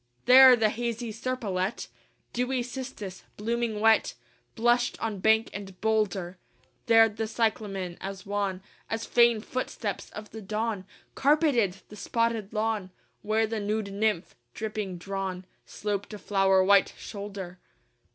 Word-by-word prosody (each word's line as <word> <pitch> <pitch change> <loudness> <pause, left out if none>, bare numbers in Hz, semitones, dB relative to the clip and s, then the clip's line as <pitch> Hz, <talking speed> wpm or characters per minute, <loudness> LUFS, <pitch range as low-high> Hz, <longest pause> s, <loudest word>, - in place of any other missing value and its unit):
IV - - -42
There 255 0 +9
the 220 -2 +2
hazy 235 0 -3
serpolet, 215 -4 -3 0.5
Dewy 250 +1 0
cistus, 245 -7 -7 0.2
blooming 230 0 -1
wet, 225 +1 +3 0.4
Blushed 240 +1 +2
on 215 -3 -3
bank 220 +3 +3
and 195 -2 -8
boulder: 195 -5 0 0.5
There 225 -1 +7
the 220 +1 -4
cyclamen, 210 -5 -2
as 195 +1 -6
wan 200 -2 -2 0.3
As 225 0 -2
faint 235 -2 +4
footsteps 230 -5 -4
of 210 0 -9
the 220 - -8
Dawn, 215 -1 -3 0.3
Carpeted 270 - +2
the 210 - -10
spotted 230 -1 -1
lawn: 215 -3 -1 0.3
Where 220 +1 +1
the 220 0 -3
nude 210 -1 -2
nymph, 205 -3 0 0.2
dripping 210 -4 -4
drawn, 190 0 -4 0.2
Sloped 205 0 -4
a - - -7
flower 195 -2 +3
white 200 0 +4
shoulder. 200 -3 -7
215 Hz, 130 wpm, -28 LUFS, 195-230 Hz, 0.5 s, There